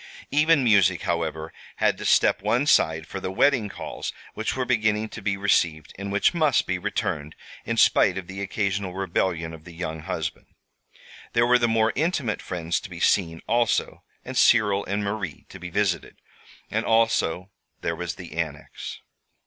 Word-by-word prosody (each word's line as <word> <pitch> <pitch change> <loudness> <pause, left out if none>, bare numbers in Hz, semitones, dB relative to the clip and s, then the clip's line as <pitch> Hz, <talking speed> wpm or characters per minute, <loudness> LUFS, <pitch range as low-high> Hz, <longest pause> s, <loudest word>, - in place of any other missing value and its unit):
Even 150 0 +4
music, 100 -6 +4
however, 80 -1 -2 0.2
had - - +1
to - - -6
step - - +4
one 125 +4 +1
side 80 - +3
for 95 - -6
the 95 - -4
wedding 120 0 +2
calls - - -6 0.2
which 110 - -2
were 130 -1 -1
beginning 110 -3 +1
to 110 - -8
be 100 0 -1
received, 85 -6 +1
and 100 +1 -5
which 100 - +3
must 155 -5 +2
be 90 -1 -2
returned, 90 -6 -3 0.3
in - - -1
spite 95 - +4
of 95 - -5
the 95 +2 -7
occasional 100 -2 -2
rebellion 85 -3 -1
of 80 -1 -11
the 85 - -12
young 80 -2 -4
husband. 80 - -4 0.9
There 120 0 +4
were 125 +1 +4
the 120 - +3
more 115 0 +2
intimate 140 - 0
friends 85 -1 -2
to 100 - -10
be 90 -2 -8
seen, 80 -3 +2
also, 115 0 +1 0.2
and 130 - -6
Cyril 105 -5 +4
and 100 +2 -2
Marie 100 -5 -4
to - - -11
be 90 - -7
visited. 100 -1 -1 0.6
And - - 0
always 115 0 +3 0.6
there 85 - -1
was 80 -1 -4
the 90 -2 -10
Annex. 75 -2 -5
100 Hz, 175 wpm, -25 LUFS, 85-115 Hz, 0.9 s, Even